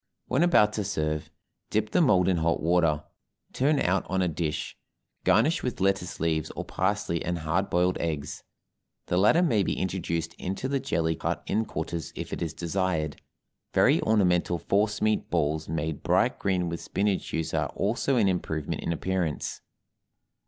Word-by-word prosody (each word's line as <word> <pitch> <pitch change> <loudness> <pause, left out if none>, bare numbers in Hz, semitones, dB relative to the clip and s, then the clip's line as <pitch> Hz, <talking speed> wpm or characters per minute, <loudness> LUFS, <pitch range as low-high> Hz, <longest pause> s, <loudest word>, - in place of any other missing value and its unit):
When 130 +5 +1
about 105 -12 +5
to 105 - -1
serve, 75 -5 -2 0.4
dip 110 0 0
the 180 - +3
mold 95 - +4
in 95 -2 +3
hot 85 0 +1
water, 80 -2 +2 0.5
turn 145 +2 +2
out 90 +2 +1
on 95 0 +1
a - - +2
dish, 80 -1 -3 0.5
garnish 155 - +3
with 125 -4 -3
lettuce 95 -2 0
leaves 80 -2 0
or - - -4
parsley 100 -5 -1
and 85 0 -1
hard 85 +5 -1
boiled 90 +1 +2
eggs. 75 -4 -3 0.6
The 90 - 0
latter 135 - +5
may 115 - +3
be - - -1
introduced 85 -3 -2
into 95 +8 -3
the 140 0 0
jelly 80 -12 0
cut - - -3
in 110 +2 0
quarters 80 -1 -4
if - - -6
it - - -4
is 85 -2 -3
desired; 85 -3 -1 0.5
very - - +5
ornamental 90 -5 +2
force 105 +4 0
meat 110 0 +1
balls 80 -2 0
made 80 -1 -2
bright - - +2
green 90 -3 0
with 85 0 -4
spinach 100 -1 -1
juice 80 -1 -3
are - - 0
also 120 +6 0
an 110 -5 +3
improvement 80 -5 -2
in - - -2
appearance. 85 -2 -2
90 Hz, 165 wpm, -27 LUFS, 80-105 Hz, 0.6 s, about